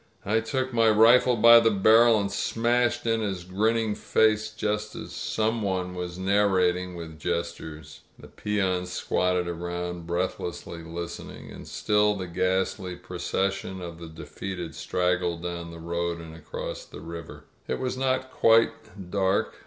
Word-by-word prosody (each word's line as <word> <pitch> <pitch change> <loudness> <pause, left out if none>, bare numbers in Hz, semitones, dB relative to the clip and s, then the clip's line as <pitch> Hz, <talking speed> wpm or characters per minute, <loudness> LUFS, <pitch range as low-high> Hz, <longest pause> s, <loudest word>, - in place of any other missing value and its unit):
"I 110 +3 +2
took 130 +3 -2
my 115 -1 +4
rifle 115 +3 +6
by 115 +1 +8
the 115 -1 +4
barrel 110 +2 +5
and 100 -1 -2
smashed 120 +1 +1
in 115 -1 +1
his 95 -4 -3
grinning 110 +4 +1
face, 110 0 +2
just 105 0 -3
as - - -7
" - - -9 0.2
some 110 +1 +1
one 95 -2 -2
was 90 -1 -5
narrating, 95 -2 +2
with 80 -2 -8
gestures. 85 -2 -4 0.2
The - - -13
peons 95 -3 -1
squatted 90 -1 0
around, 85 0 -4
breathlessly 85 -1 -3
listening. 85 +1 -7
• - - -12
• - - -11
• - - -9
And - - -11
still 105 0 +2
the 95 -2 -4
ghastly 95 +1 -1
procession 95 +2 -3
of 85 -2 -8
the 85 - -8
defeated 85 +1 -6
straggled 90 0 -1
down 85 -1 -4
the 85 - -9
road 85 +1 -2
and 80 -1 -10
across 80 - -6
the - - -11
river. 85 0 -8 0.2
It 65 - -1
was 130 - -2
not 130 0 +1
yet 130 0 -18
quite 115 -6 +2
dark. 95 -1 +1
95 Hz, 160 wpm, -26 LUFS, 85-110 Hz, 0.2 s, by